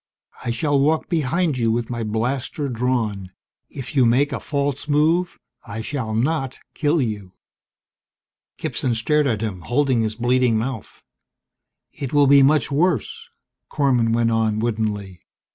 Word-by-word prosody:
"I 125 Hz, -, -3 dB
shall 145 Hz, +4 st, +1 dB
walk 155 Hz, +3 st, +1 dB
behind 160 Hz, -1 st, 0 dB
you 115 Hz, -1 st, +2 dB
with 120 Hz, +1 st, -2 dB
my 120 Hz, -1 st, -3 dB
blaster 125 Hz, +6 st, -2 dB
drawn. 115 Hz, -6 st, -1 dB, 0.4 s
If 135 Hz, 0 st, -7 dB
you 130 Hz, -, +5 dB
make 130 Hz, +5 st, +3 dB
a -, -, -2 dB
false 140 Hz, -1 st, -2 dB
move, 160 Hz, +4 st, +2 dB, 0.3 s
I 110 Hz, -1 st, -6 dB
shall 115 Hz, -3 st, -3 dB
not 135 Hz, +2 st, -1 dB, 0.2 s
kill 150 Hz, -2 st, +1 dB
you." 105 Hz, -4 st, -6 dB, 1.2 s
Gibson 125 Hz, -3 st, -2 dB
stared 150 Hz, +6 st, +1 dB
at 110 Hz, -5 st, -1 dB
him, 100 Hz, -5 st, -4 dB
holding 130 Hz, +2 st, +1 dB
his 110 Hz, -1 st, -1 dB
bleeding 120 Hz, 0 st, +2 dB
mouth. 115 Hz, -1 st, -5 dB, 0.9 s
"It 135 Hz, -1 st, -6 dB
will 145 Hz, -1 st, +5 dB
be 140 Hz, 0 st, +6 dB
much 150 Hz, +2 st, +3 dB
worse," 155 Hz, -, 0 dB, 0.4 s
Korman 125 Hz, -6 st, +2 dB
went 115 Hz, 0 st, +2 dB
on 110 Hz, -1 st, +1 dB
woodenly. 105 Hz, -4 st, -2 dB
125 Hz, 145 wpm, -22 LUFS, 115-145 Hz, 1.2 s, be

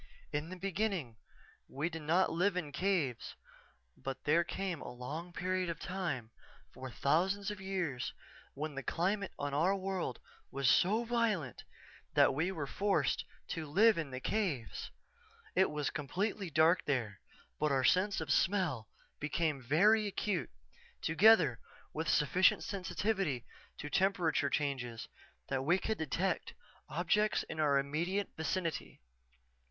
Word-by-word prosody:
In 150 Hz, +3 st, -2 dB
the 185 Hz, -, -6 dB
beginning 185 Hz, -, -2 dB, 0.5 s
we 145 Hz, +4 st, -2 dB
did 165 Hz, -2 st, -5 dB
not 170 Hz, +5 st, +2 dB
live 180 Hz, +3 st, +1 dB
in 155 Hz, -5 st, -3 dB
caves 145 Hz, -, -1 dB, 0.6 s
but 135 Hz, -1 st, -6 dB
there 165 Hz, +3 st, +4 dB
came 180 Hz, -2 st, -3 dB
a -, -, -6 dB
long 145 Hz, +8 st, -6 dB
period 185 Hz, +1 st, -1 dB
of 165 Hz, -2 st, -4 dB
time, 165 Hz, -12 st, -3 dB, 0.4 s
for 130 Hz, -, -7 dB
thousands 190 Hz, +10 st, +1 dB
of 205 Hz, -2 st, -7 dB
years, 180 Hz, -10 st, -2 dB, 0.4 s
when 150 Hz, +1 st, -4 dB
the 135 Hz, -, -4 dB
climate 190 Hz, -, -1 dB
on 145 Hz, 0 st, -3 dB
our 170 Hz, +7 st, +3 dB
world 190 Hz, -9 st, -3 dB, 0.3 s
was 135 Hz, -1 st, -1 dB
so 215 Hz, -, +4 dB
violent 225 Hz, -, -1 dB, 0.5 s
that -, -, +6 dB
we 165 Hz, +7 st, 0 dB
were 160 Hz, -6 st, -3 dB
forced 160 Hz, -2 st, 0 dB, 0.2 s
to 160 Hz, -2 st, -4 dB
live 210 Hz, +9 st, +5 dB
in 155 Hz, -4 st, -3 dB
the 130 Hz, -1 st, -5 dB
caves. 160 Hz, -, -2 dB, 0.6 s
It 190 Hz, -, +4 dB
was 150 Hz, -1 st, -2 dB
completely 185 Hz, +6 st, -2 dB
dark 160 Hz, +3 st, +4 dB
there 115 Hz, -9 st, -1 dB, 0.4 s
but 150 Hz, -1 st, +1 dB
our 135 Hz, -1 st, +2 dB
sense 190 Hz, +8 st, +3 dB
of -, -, -3 dB
smell 180 Hz, -, +1 dB, 0.3 s
became 150 Hz, -1 st, -1 dB
very 205 Hz, -, +4 dB
acute, 200 Hz, -2 st, -1 dB, 0.5 s
together 160 Hz, -, +5 dB, 0.3 s
with 160 Hz, 0 st, -2 dB
sufficient 180 Hz, +6 st, +4 dB
sensitivity 190 Hz, -, -1 dB, 0.3 s
to -, -, -6 dB
temperature 175 Hz, -3 st, +2 dB
changes 130 Hz, -6 st, -2 dB, 0.4 s
that 135 Hz, -1 st, 0 dB
we 175 Hz, +6 st, +3 dB
could 215 Hz, +3 st, -2 dB
detect 165 Hz, +5 st, -1 dB, 0.3 s
objects 210 Hz, 0 st, +1 dB
in 160 Hz, -, -7 dB
our 145 Hz, -2 st, +4 dB
immediate 170 Hz, +8 st, -1 dB
vicinity. 165 Hz, +1 st, -3 dB
165 Hz, 135 wpm, -34 LUFS, 140-190 Hz, 0.6 s, that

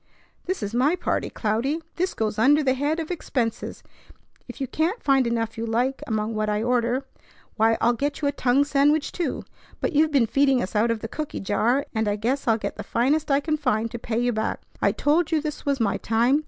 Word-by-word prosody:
"This 370 Hz, -, -2 dB
is 205 Hz, +2 st, -4 dB
my 270 Hz, +8 st, +3 dB
party, -, -, -1 dB
Cloudy. 235 Hz, +8 st, -1 dB, 0.2 s
This 365 Hz, +2 st, -1 dB
goes 215 Hz, -1 st, -1 dB
under 290 Hz, +6 st, +5 dB
the 260 Hz, -2 st, +3 dB
head 290 Hz, +5 st, -1 dB
of 320 Hz, +1 st, -4 dB
expenses. 240 Hz, -9 st, -3 dB, 0.6 s
If -, -, -10 dB
you 270 Hz, -, -1 dB
can't 325 Hz, -, -1 dB
find 270 Hz, -3 st, +3 dB
enough 225 Hz, -1 st, -2 dB
you 230 Hz, -, -2 dB
like 250 Hz, +4 st, 0 dB
among 220 Hz, 0 st, -1 dB
what 215 Hz, 0 st, -1 dB
I 210 Hz, +1 st, 0 dB
order, 245 Hz, +2 st, +1 dB, 0.5 s
why, 225 Hz, 0 st, +3 dB
I'll 240 Hz, -, +3 dB
get 280 Hz, +4 st, -2 dB
you 290 Hz, -, 0 dB
a -, -, +2 dB
tongue 270 Hz, 0 st, +2 dB
sandwich, 290 Hz, +1 st, +2 dB
too; 350 Hz, -, -3 dB, 0.3 s
but -, -, -1 dB
you've 310 Hz, +1 st, +3 dB
been 275 Hz, -5 st, +4 dB
feeding 270 Hz, +3 st, +3 dB
us 195 Hz, -2 st, -4 dB
out 220 Hz, +3 st, +3 dB
of 230 Hz, -1 st, -1 dB
the 225 Hz, -, -4 dB
cooky 305 Hz, +6 st, -5 dB
jar, 235 Hz, +7 st, +1 dB
and 220 Hz, -1 st, 0 dB
I 205 Hz, -, +1 dB
guess 250 Hz, +6 st, -1 dB
I'll 225 Hz, -1 st, +4 dB
get -, -, -5 dB
the -, -, -5 dB
finest 280 Hz, +7 st, +1 dB
I 275 Hz, 0 st, +3 dB
can 310 Hz, +1 st, -1 dB
find 230 Hz, -6 st, 0 dB
to 235 Hz, -, -5 dB
pay 225 Hz, -1 st, -3 dB
you 245 Hz, 0 st, +1 dB
back. 220 Hz, +1 st, -2 dB, 0.2 s
I -, -, +4 dB
told 320 Hz, +5 st, +1 dB
you 320 Hz, -, +3 dB
this 300 Hz, -1 st, -5 dB
was 280 Hz, -1 st, +1 dB
my 215 Hz, -4 st, +1 dB
time. 235 Hz, +6 st, +2 dB
250 Hz, 225 wpm, -24 LUFS, 225-290 Hz, 0.6 s, under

